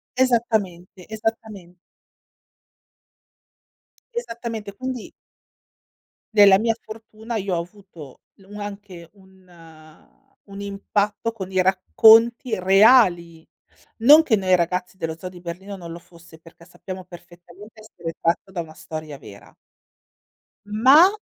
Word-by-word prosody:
Esattamente, 215 Hz, -8 st, -1 dB
esattamen 215 Hz, -5 st, -6 dB, 2.4 s
Esattamente, 230 Hz, -, -6 dB
quindi 255 Hz, 0 st, -6 dB, 1.2 s
nella 200 Hz, -2 st, +7 dB
mia 225 Hz, 0 st, +1 dB
fortuna 220 Hz, +1 st, -9 dB
io 195 Hz, -4 st, -2 dB
ho 170 Hz, -, -1 dB
avuto 175 Hz, -6 st, -14 dB
l 195 Hz, -, -22 dB, 0.2 s
anche 200 Hz, -5 st, -9 dB
un 190 Hz, -2 st, -23 dB, 1.0 s
un 200 Hz, 0 st, -12 dB
impatto 200 Hz, +2 st, -2 dB
con 190 Hz, -4 st, -8 dB
i 185 Hz, -, +1 dB
racconti 220 Hz, +5 st, +4 dB
reali. 185 Hz, -4 st, +3 dB, 0.5 s
Non 295 Hz, +8 st, +7 dB
che 235 Hz, -, +2 dB
Noi 185 Hz, -1 st, +2 dB
ragazzi 180 Hz, +2 st, -2 dB
dello 160 Hz, -3 st, -4 dB
zoo 185 Hz, +2 st, -8 dB
di 180 Hz, -, -14 dB
Berlino, 180 Hz, +4 st, -8 dB
non 170 Hz, -2 st, -10 dB
lo 170 Hz, -, -8 dB
fosse, 170 Hz, -2 st, -19 dB
perché 165 Hz, +1 st, -18 dB
sappiamo 185 Hz, +1 st, -10 dB
perfettamente 175 Hz, +5 st, -15 dB
essere 170 Hz, -6 st, -8 dB
tratto 170 Hz, +3 st, -1 dB
da 175 Hz, -, -4 dB
una 160 Hz, -1 st, -11 dB
storia 155 Hz, -2 st, -8 dB
vera 100 Hz, -5 st, -15 dB, 1.1 s
ma 260 Hz, -, +6 dB
195 Hz, 115 wpm, -22 LUFS, 175-220 Hz, 2.4 s, nella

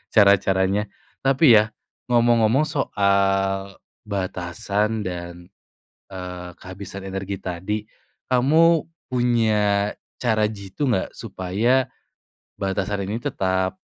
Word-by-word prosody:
cara-caranya. 100 Hz, 0 st, +4 dB, 0.3 s
Tapi, 135 Hz, -4 st, +6 dB
ya, 110 Hz, -, +1 dB, 0.4 s
ngomong-ngomong 120 Hz, +2 st, +4 dB
soal 100 Hz, -, +1 dB, 0.3 s
batasan, 100 Hz, +3 st, -2 dB
dan, 85 Hz, -1 st, -7 dB, 0.6 s
eee, 90 Hz, -1 st, -6 dB
kehabisan 100 Hz, +1 st, -8 dB
energi 95 Hz, 0 st, -4 dB
tadi, 100 Hz, +4 st, -4 dB, 0.4 s
kamu 155 Hz, +6 st, +4 dB, 0.2 s
punya 110 Hz, -5 st, +1 dB, 0.3 s
cara 110 Hz, -3 st, +2 dB
jitu 105 Hz, +6 st, -4 dB
nggak 105 Hz, -7 st, 0 dB
supaya 115 Hz, +8 st, 0 dB, 0.7 s
batasan 100 Hz, +1 st, -2 dB
ini 110 Hz, +4 st, -3 dB
tetap, 95 Hz, -2 st, -1 dB
100 Hz, 85 wpm, -23 LUFS, 95-115 Hz, 0.7 s, Tapi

